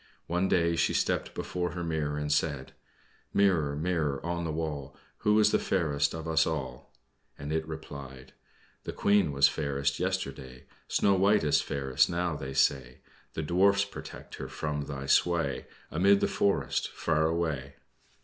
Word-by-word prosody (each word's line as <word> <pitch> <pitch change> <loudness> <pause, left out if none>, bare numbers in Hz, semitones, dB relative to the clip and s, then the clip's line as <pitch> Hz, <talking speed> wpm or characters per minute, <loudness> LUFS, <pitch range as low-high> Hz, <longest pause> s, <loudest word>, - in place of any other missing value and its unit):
One 90 +3 0
day 85 -2 +2
she 85 0 +1
stepped - - 0
before 90 -1 -3
her 90 -1 -4
mirror, 80 -3 -2
and 75 0 0
said: 75 -3 -1 0.6
"Mirror, 85 -8 +3
mirror 75 -3 -1
on 85 0 -2
the 80 - -2
wall, 75 -4 -4 0.2
Who 105 0 +3
is 105 0 +5
the - - +3
fairest 75 -6 0
of 80 0 -6
us 80 0 +3
all?" 65 -6 -5 0.5
and 75 +2 -5
it 80 0 -1
replied: 70 -4 -9 0.5
"The - - -5
Queen 100 -6 +3
was 70 0 +5
fairest 70 -2 -1
yesterday; 70 -9 -3 0.2
Snow 100 - +3
White 100 +2 +3
is 75 - +3
fairest 65 -2 +1
now, 90 -1 -1
they 65 -2 -6
say. 65 -2 +1 0.3
The 80 - -2
Dwarfs 100 +5 +3
protect 100 - -10
her - - -6
from 75 -2 -3
thy 70 -2 -6
sway 85 -1 +1 0.2
Amid 100 +5 +4
the - - +1
forest, 75 -10 0
far 80 -1 +1
away." 80 -5 -2
80 Hz, 160 wpm, -29 LUFS, 70-90 Hz, 0.6 s, is